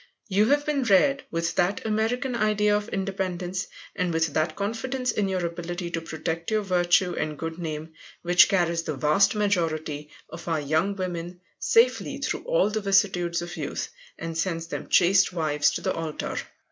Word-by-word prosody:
You 205 Hz, +2 st, +3 dB
have 290 Hz, +2 st, +2 dB
been 295 Hz, -2 st, 0 dB
reared 270 Hz, +5 st, +3 dB
with 165 Hz, 0 st, -1 dB
that 180 Hz, +5 st, +1 dB
American 225 Hz, +4 st, 0 dB
idea 210 Hz, -2 st, +2 dB
of 210 Hz, +2 st, -2 dB
independence, 190 Hz, -2 st, -3 dB, 0.3 s
and 180 Hz, -2 st, 0 dB
with 160 Hz, -2 st, 0 dB
that 155 Hz, +2 st, 0 dB
confidence 245 Hz, +5 st, -2 dB
in 205 Hz, -3 st, 0 dB
your 185 Hz, -2 st, -1 dB
ability 175 Hz, +1 st, -4 dB
to 165 Hz, -, -2 dB
protect 165 Hz, +1 st, -4 dB
your 215 Hz, -1 st, +1 dB
virtue 180 Hz, -1 st, +2 dB
and 155 Hz, -1 st, -3 dB
good 165 Hz, +2 st, -5 dB
name, 160 Hz, -1 st, -5 dB, 0.3 s
which 175 Hz, 0 st, +6 dB
carries 170 Hz, -3 st, +1 dB
the 155 Hz, -3 st, -4 dB
vast 150 Hz, +10 st, +3 dB
majority 160 Hz, -7 st, -1 dB, 0.2 s
of 170 Hz, +1 st, -10 dB
our 165 Hz, -2 st, +1 dB
young 160 Hz, +7 st, 0 dB
women 175 Hz, -2 st, -4 dB, 0.2 s
safely 460 Hz, +1 st, +3 dB
through -, -, -2 dB
all -, -, +2 dB
the 215 Hz, 0 st, -1 dB
vicissitudes 180 Hz, -4 st, +2 dB
of 175 Hz, 0 st, -7 dB
youth, -, -, -4 dB, 0.3 s
and 165 Hz, 0 st, -5 dB
sends 165 Hz, 0 st, -1 dB
them 165 Hz, -, -6 dB
chaste 185 Hz, +2 st, +5 dB
wives 150 Hz, -3 st, +2 dB
to -, -, -3 dB
the -, -, 0 dB
altar. 160 Hz, -2 st, -4 dB
180 Hz, 170 wpm, -26 LUFS, 165-205 Hz, 0.3 s, which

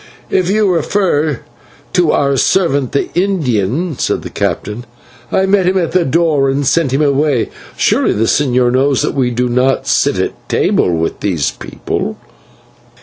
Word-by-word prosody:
"If 185 Hz, -1 st, +1 dB
you 210 Hz, +1 st, +2 dB
refer 165 Hz, -, 0 dB, 0.5 s
to 185 Hz, -, +3 dB
your 140 Hz, -3 st, +1 dB
servant, 140 Hz, -3 st, +1 dB
the 140 Hz, -, -2 dB
Indian," 155 Hz, -, -1 dB
said -, -, -1 dB
the -, -, -7 dB
captain, 110 Hz, +4 st, -3 dB, 0.4 s
"I 190 Hz, -, +2 dB
met 195 Hz, -1 st, +2 dB
him 190 Hz, +1 st, +2 dB
at 170 Hz, -4 st, 0 dB
the 180 Hz, -2 st, +2 dB
door 150 Hz, -2 st, +2 dB
and 140 Hz, +1 st, -1 dB
sent 155 Hz, -1 st, +1 dB
him 135 Hz, +3 st, +1 dB
away. 140 Hz, -3 st, +1 dB, 0.3 s
Surely -, -, +2 dB
the 110 Hz, -, 0 dB
señor 125 Hz, 0 st, +2 dB
knows 135 Hz, +1 st, +2 dB
that -, -, -1 dB
we 130 Hz, -3 st, +1 dB
do 125 Hz, +1 st, -1 dB
not 125 Hz, +2 st, +1 dB
sit -, -, +1 dB
at -, -, -4 dB
table -, -, +1 dB
with 80 Hz, -1 st, -2 dB
these 85 Hz, -8 st, -1 dB
people." -, -, -5 dB
140 Hz, 160 wpm, -14 LUFS, 125-175 Hz, 0.5 s, to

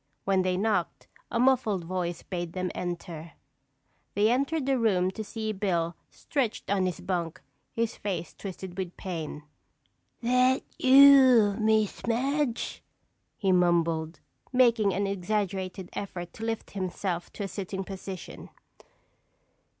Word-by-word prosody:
When 195 Hz, -1 st, +3 dB
they 185 Hz, 0 st, 0 dB
knocked, 205 Hz, -3 st, -1 dB, 0.2 s
a 230 Hz, -, -1 dB
muffled 240 Hz, -7 st, +3 dB
voice 175 Hz, -1 st, -3 dB
bade 175 Hz, -2 st, -4 dB
them 185 Hz, -1 st, -2 dB
enter. 170 Hz, -2 st, -5 dB, 0.8 s
They 210 Hz, +3 st, +4 dB
entered 280 Hz, +3 st, 0 dB
the 270 Hz, -1 st, +2 dB
room 190 Hz, -5 st, +2 dB
to 220 Hz, +3 st, -5 dB
see 220 Hz, 0 st, -4 dB
Bill 175 Hz, -5 st, -1 dB
stretched 250 Hz, -8 st, -2 dB
on 190 Hz, -2 st, +2 dB
his 180 Hz, -, -4 dB
bunk, 170 Hz, -4 st, -2 dB, 0.3 s
his 230 Hz, -1 st, -1 dB
face 195 Hz, -4 st, -4 dB
twisted 190 Hz, -1 st, -7 dB
with 180 Hz, -2 st, -4 dB
pain. 160 Hz, -5 st, -5 dB, 0.8 s
"Thet 250 Hz, +2 st, +3 dB, 0.2 s
you, 260 Hz, -6 st, +7 dB
Miss 215 Hz, -1 st, +1 dB
Madge?" 265 Hz, +2 st, -1 dB, 0.6 s
he 195 Hz, -2 st, +1 dB
mumbled, 170 Hz, -2 st, +2 dB, 0.3 s
making 235 Hz, -5 st, +4 dB
an 200 Hz, +2 st, 0 dB
exaggerated 190 Hz, -1 st, -2 dB
effort 175 Hz, -3 st, -6 dB
to 225 Hz, -, -6 dB
lift 225 Hz, -1 st, -3 dB
himself 185 Hz, -2 st, -3 dB
to 205 Hz, -, -5 dB
a -, -, -2 dB
sitting 195 Hz, 0 st, -4 dB
position. 190 Hz, -2 st, -8 dB
195 Hz, 125 wpm, -28 LUFS, 180-225 Hz, 0.8 s, you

